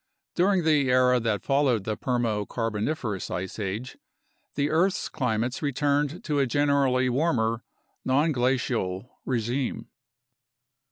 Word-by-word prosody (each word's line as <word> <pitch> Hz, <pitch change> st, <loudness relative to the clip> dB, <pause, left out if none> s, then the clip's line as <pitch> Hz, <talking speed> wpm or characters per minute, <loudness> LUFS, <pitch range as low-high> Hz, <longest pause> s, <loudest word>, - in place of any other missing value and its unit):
During 185 Hz, 0 st, +2 dB
the 150 Hz, -4 st, +3 dB
era 125 Hz, 0 st, +4 dB
that 110 Hz, -4 st, -1 dB
followed 135 Hz, -6 st, +2 dB
the 110 Hz, +1 st, -2 dB
Permo 115 Hz, -5 st, -1 dB
Carboniferous 115 Hz, -1 st, -2 dB
ice 95 Hz, +4 st, -4 dB
age, 105 Hz, +6 st, -4 dB, 0.6 s
the 145 Hz, +1 st, 0 dB
earth's 180 Hz, +4 st, +1 dB
climates 125 Hz, -3 st, -1 dB
returned 145 Hz, +2 st, 0 dB
to 150 Hz, -2 st, 0 dB
a 135 Hz, -, +2 dB
generally 140 Hz, -2 st, +2 dB
warmer, 120 Hz, -5 st, +1 dB, 0.4 s
nonglacial 125 Hz, -, 0 dB, 0.2 s
regime. 125 Hz, +1 st, -2 dB
130 Hz, 110 wpm, -26 LUFS, 115-145 Hz, 0.6 s, era